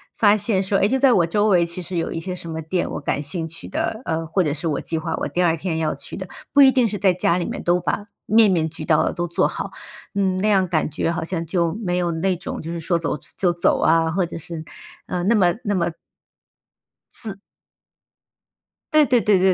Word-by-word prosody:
发 210 -1 +5
现 195 -2 +1
说， 195 +1 +1
诶， 200 - +4
就 265 - +1
在 265 -1 +5
我 170 -6 +3
周 205 +5 +1
围 175 -3 +4
其 170 +2 -4
实 175 0 -5
有 165 - -1
一 165 - -3
些 180 +2 -4
什 170 -2 -8
么 160 0 -4
店 175 +3 -2
我 - - -4
感 145 - -1
兴 160 +3 -3
趣 160 - -9
的， 220 - -2
呃， 165 0 -2
或 165 +4 0
者 150 - 0
是 165 +2 -3
我 150 - 0
计 165 - -2
划 160 0 -3
我 - - -2
第 180 - 0
2 165 -1 +3
天 165 0 -2
要 160 -1 0
去 - - -8
的。 190 -1 -6 0.3
不 285 - +7
一 265 -1 +8
定 250 -3 +3
是 205 0 -3
在 190 -2 +3
家 175 -1 +1
里 175 - -1
面 - - -5
都 175 +1 +2
把 180 +6 -2 0.2
面 220 -1 +5
面 160 -3 +1
俱 - - -7
到 155 - +3
的 - - 0
都 175 0 -2
做 170 - +1
好， - - -5 0.4
嗯， 190 -2 +1
那 205 +3 0
样 190 -3 +3
感 155 -4 +1
觉 165 +2 -1
好 170 -1 -3
像 170 -1 -3
就 170 -1 0
没 180 -1 0
有 175 -1 0
那 180 +3 0
种 185 - -6
就 165 +1 -6
是 170 - -4
说 170 +1 0
走 165 -2 -2 0.2
就 180 -2 +2
走 170 0 +1
啊， 165 0 +3
或 185 +1 +1
者 165 - -7
是， 165 0 -7 0.4
呃， 180 - -2
那 225 +5 +3
么 180 -4 +4
那 205 -1 +1
么 170 -2 0 1.2
自 210 -4 -1 1.6
对 310 - +7
对 245 -2 +4
对 205 -3 +3
175 Hz, 260 characters per minute, -22 LUFS, 165-195 Hz, 1.6 s, 一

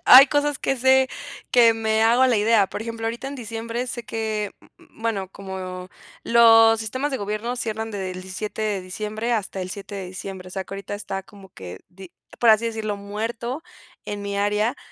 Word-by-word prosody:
Hay 265 +2 +11
cosas 290 -1 +1
que 270 - 0
sé 260 +1 +4 0.4
que 230 -2 +6
me 220 0 +1
hago 240 +3 +5
la 245 -3 +3
idea. 210 -2 +4
Por - - -6
ejemplo, 230 0 -4
ahorita 235 +3 -4
en 275 - -5
diciembre 230 0 -4
sé 240 -1 -5
que, 215 -2 -3
mm - - -18 0.3
mm, 225 - -16
bueno, 200 -5 -1
como 185 -2 -7 0.3
los 225 -1 +6
sistemas 255 +7 -2
de 265 - -1
gobierno 215 +4 -3
cierran 225 -1 -3
desde 190 -3 -4
el 185 0 -7
17 205 +3 -5
de 205 -3 0
diciembre 215 +5 -3
hasta 200 -4 -2
el 185 - -5
7 200 +1 -7
de 190 -2 -5
diciembre. 185 0 -7
O - - -14
sea, 190 - -3
que 195 - -9
ahorita 200 0 -6
está 195 -2 -5
como 195 -1 -15
que 90 - -10
di 185 0 -13 0.3
por 235 - +6
así 220 +1 +4
decirlo, 220 -2 -3
muerto, 230 +7 -4 0.4
en 205 0 -5
mi 200 0 -3
área, 210 +5 +1
220 Hz, 200 wpm, -23 LUFS, 195-230 Hz, 0.4 s, Hay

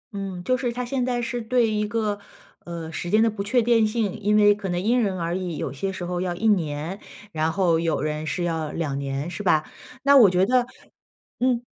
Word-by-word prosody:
嗯， 195 -3 -5
就 255 - +2
是 245 -1 -2
他 250 +1 -4
现 255 +1 -1
在 245 -1 0
是 240 0 -3
对 235 +1 +2
一 210 0 0
个， 210 -2 -1 0.5
呃， 170 -2 -6
时 170 +2 -5
间 215 +4 +4
的 230 - +3
不 205 -2 -4
确定 230 +1 +3
性， 215 -3 -1
因 210 +1 +2
为 205 -1 +6
可 205 -2 -5
能 175 0 -1
因 235 +6 +2
人 195 -4 -1
而 170 0 -2
异。 180 -4 -3
有 130 - -4
些 190 +8 -3
时 185 -2 -6
候 175 0 -2
要 180 -1 -2
1 220 +6 -1
年， 165 -1 -1 0.3
然 160 -1 0
后 170 -3 +2
有 165 -2 0
人 150 +1 -3
是 175 - -2
要 160 -3 -2
2 145 -4 -2
年 140 +1 -3
是 205 - -5
吧？ 160 -6 +3 0.4
那 280 +1 +6
我 235 -8 +8
觉 180 +1 +3
得 250 +2 +2 0.7
嗯。 245 -1 +1
195 Hz, 235 characters per minute, -24 LUFS, 170-230 Hz, 0.7 s, 我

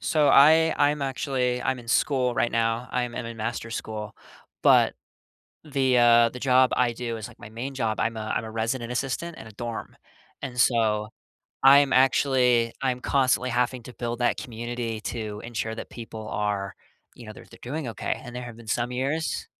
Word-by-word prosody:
So 150 -2 +2
I 160 +3 +6
I'm 145 0 +2
actually 130 -2 -1
I'm 130 -1 -1
in 115 -1 -12
school 125 -2 +1
right 120 - +1
now. 115 +1 0
I'm 125 -1 -1
I'm 120 - -4
in 115 - -7
master 115 +1 -4
school. 110 -2 -5 0.5
But - - +5 0.7
the, 135 -4 +1
uh 120 -1 +6
the 125 - -9
job 130 0 +4
I 120 -2 +2
do 115 -1 -4
is 110 - -6
like - - -17
my 105 - -10
main 125 +5 -6
job, 115 -4 -1
I'm 115 0 -1
a 110 0 -3
I'm 115 - -1
a 110 - -7
resident 115 +2 -2
assistant 135 +7 -3
in - - -10
a 110 - -11
dorm. 115 +2 -6 0.5
And 125 -2 -5
so, 110 -3 +2 0.5
I'm 140 0 +7
actually 125 -3 +3
I'm 130 -2 0
constantly 130 -1 +1
having 125 0 0
to 125 - -11
build 120 0 -4
that 120 - +1
community 120 -2 -5
to 110 -3 -5
ensure 115 -1 -4
that - - -8
people 110 -2 -8
are 100 -2 -2 0.4
you 120 - -12
know, 110 - -9
they're - - -13
they're - - -15
doing 140 +2 -4
okay 115 - -3
and 120 0 -9
there 125 - -5
have 120 -2 -9
been 115 - -14
some 120 +3 -1
years 140 +6 -2
120 Hz, 195 wpm, -25 LUFS, 115-130 Hz, 0.7 s, I'm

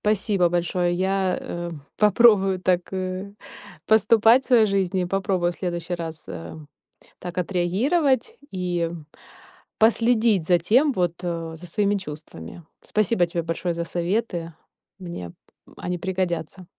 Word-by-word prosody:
Спасибо 200 -3 +2
большое. 175 +1 0
Я, 190 0 0
э, 175 0 -5 0.3
попробую 210 -3 +4
так, 180 -1 0
э, 185 +1 -4 0.5
поступать 220 +3 +5
в - - -14
своей 235 -4 +5
жизни, 190 -2 0
попробую 185 -1 0
в - - -11
следующий 175 -1 -3
раз, 165 -2 -6
э, 85 -1 -7 0.6
так 180 -1 -8
отреагировать 230 - +1 0.2
и 175 -2 -1 0.9
последить 225 -5 +3
за 175 -1 +4
тем, 255 - +3
вот, 175 -5 0
а, 165 -2 -4
за 175 +2 -9
своими 205 +4 +1
чувствами. 150 - -9 0.2
Спасибо 210 -4 +1
тебе 170 0 -3
большое 165 +2 -2
за 170 0 -3
советы, 175 -1 -2 0.5
мне 170 - -7 0.4
они 180 0 -3
пригодятся. 185 -1 -3
185 Hz, 125 wpm, -23 LUFS, 175-210 Hz, 0.9 s, поступать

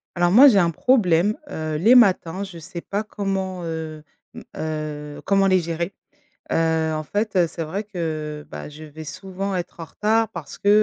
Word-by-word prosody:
Alors 175 0 +3
moi 270 +6 +9
j'ai 210 -7 +5
un 170 -2 +3
problème, 195 - +3
heu, 155 -1 -3
les 220 +10 +5
matins 190 -6 +4
je 190 -4 -7
sais 170 +2 -8
pas 205 +4 -3
comment, 195 -3 -3
heu, 160 -2 -5 0.3
mmh, - - -8 0.2
heu, 150 -2 -5
comment 195 0 +3
les 185 -1 +4
gérer, 170 +2 -3 0.6
heu, 160 -1 +1
en 155 - -2
fait 200 +1 +1
c'est 165 0 -5
vrai 195 +7 -4
que, 155 -6 -4
bah, 75 0 -7
je 150 +1 -11
vais 155 +1 -10
souvent 190 +4 -4
être 175 -1 -5
en - - -4
retard. 220 +5 +1
Parce 165 -5 -8
que, 200 - -1
170 Hz, 185 wpm, -23 LUFS, 155-195 Hz, 0.6 s, moi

